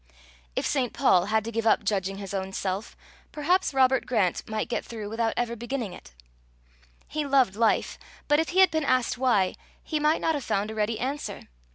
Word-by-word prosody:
If - - -1
St. 255 -4 0
Paul 185 -10 +4
had 220 +1 +1
to 230 - -4
give 230 0 -1
up 220 - +4
judging 195 -1 -1
his 195 -1 -7
own 190 0 -3
self, 190 +3 -3 0.3
perhaps 355 +5 +1
Robert 265 -1 +3
Grant 210 -8 0
might 215 0 -2
get 235 - -2
through 215 -3 -7
without 225 0 0
ever 235 -1 -1
beginning 240 -3 -4
it. - - -12 1.0
He 305 0 -2
loved 270 -8 +3
life, 225 0 +1 0.3
but 295 +1 +4
if 320 - 0
he 375 +2 +4
had 375 - +6
been 315 -1 0
asked 255 -2 +1
why, 220 -8 +2 0.3
he 310 - -2
might 300 +2 +2
not 320 - +2
have 290 -4 -3
found 205 0 -1
a - - -6
ready 220 +1 -1
answer. 275 +4 -4
235 Hz, 200 wpm, -26 LUFS, 210-275 Hz, 1.0 s, had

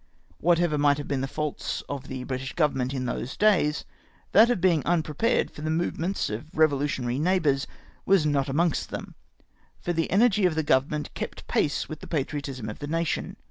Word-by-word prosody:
Whatever 170 -2 +2
might 145 -1 +4
have 145 - -5
been 140 -2 -1
the 135 - -1
faults 150 +1 -3
of 140 -1 -5
the 130 -2 -5
British 130 +1 -4
Government 135 -6 +1
in 130 -2 -3
those 125 +1 -4
days, 185 -8 +3 0.5
that 225 +3 +7
of 245 - +1
being 170 -4 +3
unprepared 170 - +1
for - - -10
the 155 - -2
movements 170 +3 -1
of 110 +8 -5
revolutionary 140 -5 +1
neighbours 155 -5 +2 0.4
was 190 -5 +3
not 140 -2 +1
amongst 165 +3 +1
them, - - -6 0.7
for 175 - -2
the 165 -1 0
energy 205 -1 +4
of 165 - -2
the 160 - +1
Government 150 +2 +1
kept - - -6
pace 145 - 0
with 155 - -7
the - - -10
patriotism 140 -5 -3
of 105 - -6
the 145 - -5
nation. 165 +1 -2
150 Hz, 180 wpm, -26 LUFS, 135-170 Hz, 0.7 s, that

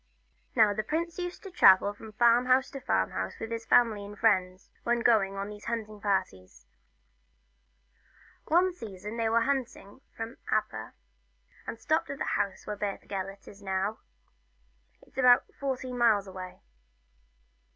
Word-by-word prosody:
Now 215 -4 +5
the 215 - -1
prince 330 - -3
used 355 0 -5
to 390 - -9
travel 195 - +6
from 215 +1 -12
farm 235 +2 +4
house 260 +1 +3
to 275 - -6
farm 95 - 0
house 95 0 -4
with 225 - -6
his 230 0 -4
family 225 -4 +4
and 205 +1 -10
friends, 185 -4 +1
when 240 0 0
going 210 -5 +3
on 195 0 -4
these 210 0 -10
hunting 215 -3 -4
parties. 185 - -2 1.8
One 355 +3 +3
season 210 - -8
they 225 -1 +1
went 230 0 +2
hunting 265 -4 -3 0.2
from 225 +2 -6
Aber, - - -2 0.7
and 230 - -6
stopped 315 +7 0
at 280 - -5
the - - -3
house 195 -2 -2
where 210 - -4
Beth 205 -1 -4
Gelert 195 0 -6
is 205 - -13
now 195 +2 -2 1.0
it - - -22
's - - -6
about 250 -1 +6 0.2
fourteen 260 -2 -3
miles 220 -4 +4
away. 185 -1 -9
220 Hz, 155 wpm, -29 LUFS, 195-245 Hz, 1.8 s, travel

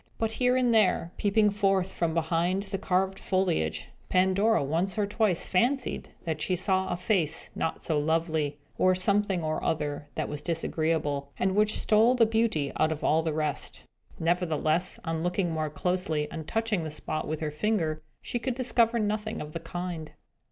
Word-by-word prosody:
But 225 -1 0
here 250 +2 +2
and 250 -2 +3
there, 195 -6 +3
peeping 210 0 +3
forth 195 -2 +1
from 165 -1 -1
behind 170 +4 +1
the 195 -1 -4
carved 190 +1 0
foliage, 180 - 0 0.2
Pandora 190 +2 +3
once 170 +8 -1
or 210 - +2
twice 205 -3 +1
fancied 250 +8 0
that 160 -3 -3
she 180 +4 +1
saw 190 +1 +1
a - - -1
face 180 -5 0
not 160 - -3
so 155 -3 +1
lovely, 160 -1 0 0.2
or 185 0 +4
something 195 -1 +2
or 155 0 -2
other 145 -2 -2
that - - -2
was 150 0 -5
disagreeable, 155 -3 -1
and 190 0 +1
which 215 +1 +3
stole 225 +4 +4
the 235 -2 +5
beauty 220 -10 +1
out 155 0 +2
of 155 - -4
all 160 +1 +3
the 160 -1 -1
rest. 150 -1 -2 0.4
Nevertheless, 165 0 +1
on 165 -1 -2
looking 175 0 0
more 155 -1 -1
closely, 160 -2 -1
and 160 -2 -6
touching 225 -5 0
the 160 - -4
spot 155 +1 -3
with 155 0 -3
her 155 -1 -2
finger, 160 -2 0 0.2
she 240 - -2
could 255 0 -2
discover 240 -2 +2
nothing 215 0 -1
of 150 0 -7
the 165 - -3
kind. 165 -1 -5
180 Hz, 175 wpm, -28 LUFS, 155-210 Hz, 0.4 s, the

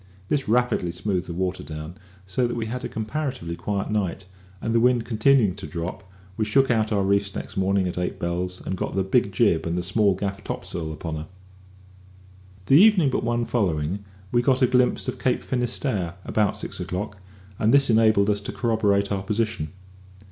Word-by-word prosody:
This 140 -6 0
rapidly 120 -6 +2
smoothed 90 +1 -2
the 85 - -5
water 95 +1 -2
down, 75 +2 -7 0.3
so 95 +7 0
that 120 - -3
we 115 - -2
had 125 +3 -4
a - - -3
comparatively 115 - -3
quiet 100 +3 -3
night; 95 -3 -1 0.3
and 115 - -2
the 115 - +4
wind 120 -1 +3
continuing 115 -2 +3
to 100 - -7
drop, 95 +2 -6 0.3
we 110 - +1
shook 135 +5 +3
out 110 -2 +1
our 100 -2 +2
reefs 100 0 +1
next - - -6
morning 95 0 +1
at 90 - -3
eight 90 - -2
bells, 90 +1 -3
and 95 - -2
got 90 - -4
the 95 - +2
big 100 +2 +2
jib 95 -5 +2
and 90 +2 -1
small 100 +1 +2
gaff 100 +2 -4
topsail 80 -5 -4
upon 80 +1 -5
her. 75 +1 -6 1.4
The 140 - +7
evening 195 -10 +5
but - - -1
one 120 0 0
following 95 -4 -1 0.3
we 120 - +3
got 130 +1 +2
a - - +8
glimpse 125 0 +2
of - - -3
Cape 130 - 0
Finisterre 120 - -1
about 105 -2 +1
six - - -5
o'clock, 100 +1 -4 0.4
and 110 - +3
this 140 -2 +5
enabled 110 -2 +4
us 100 0 -1
to 100 - -5
corroborate 105 -4 +1
our 100 -1 0
position. 105 -6 -2
105 Hz, 190 wpm, -24 LUFS, 90-120 Hz, 1.4 s, a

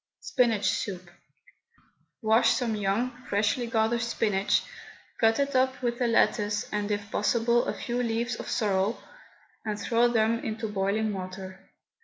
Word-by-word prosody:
SPINACH 230 -6 +1
SOUP. 185 -3 -1 1.2
Wash 220 +2 +4
some 235 -4 -1
young, 210 +5 0 0.2
freshly 215 +5 +1
gathered 230 0 +1
spinach, 210 -4 +1 0.6
cut 225 0 +4
it 280 -1 0
up 260 0 +2
with 240 0 -1
a 245 - +3
lettuce, 210 -1 +2
and, 210 0 -1
if 205 0 -3
possible, 235 +3 +2
a - - -1
few 245 0 -2
leaves 235 0 -1
of - - -7
sorrel, 200 0 0 0.6
and 210 -1 -3
throw 235 +1 +3
them 230 -1 +1
into 220 +1 -3
boiling 210 +1 0
water. 185 0 -8
220 Hz, 140 wpm, -27 LUFS, 205-235 Hz, 1.2 s, Wash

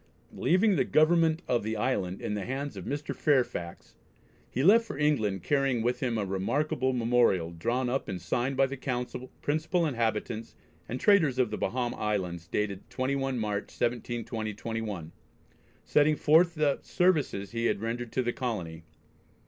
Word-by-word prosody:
Leaving 190 +2 +3
the - - +3
government 160 +1 +3
of 120 -1 +2
the 110 +1 -3
island 100 -5 -1
in - - -2
the 105 -1 -2
hands 135 +5 -4
of - - -7
"Mr. 145 +1 -3
Fairfax" 120 - 0 0.6
he 130 - -1
left 220 +7 +7
for 225 - -7
England, 110 - +1
carrying 135 -5 +1
with 125 +1 0
him 120 -3 -1
a 105 - -1
remarkable 130 +8 0
"Memorial" 115 -8 +2
drawn 120 +10 -1
up 130 +2 -1
and 95 -2 -4
signed 130 +6 -1
by 135 - +5
the 135 +1 -4
Council, 125 -1 -4
principal 160 +4 +1
inhabitants 115 -4 -2 0.3
and 125 - -3
traders 160 -10 +4
of 125 -4 +2
the 105 - -2
Bahama 125 -1 -1
Islands, 90 -6 -2
dated 100 0 -3
21 135 0 -1
March, 105 -2 -2
1720/1, 115 -5 -3 0.7
setting 150 +1 +4
forth 165 +4 +4
the 150 -3 +1
services 150 - +1
he 115 0 0
had - - 0
rendered 115 +2 -3
to 130 - 0
the 120 0 -1
colony. 90 -11 -4
125 Hz, 155 wpm, -29 LUFS, 105-140 Hz, 0.7 s, left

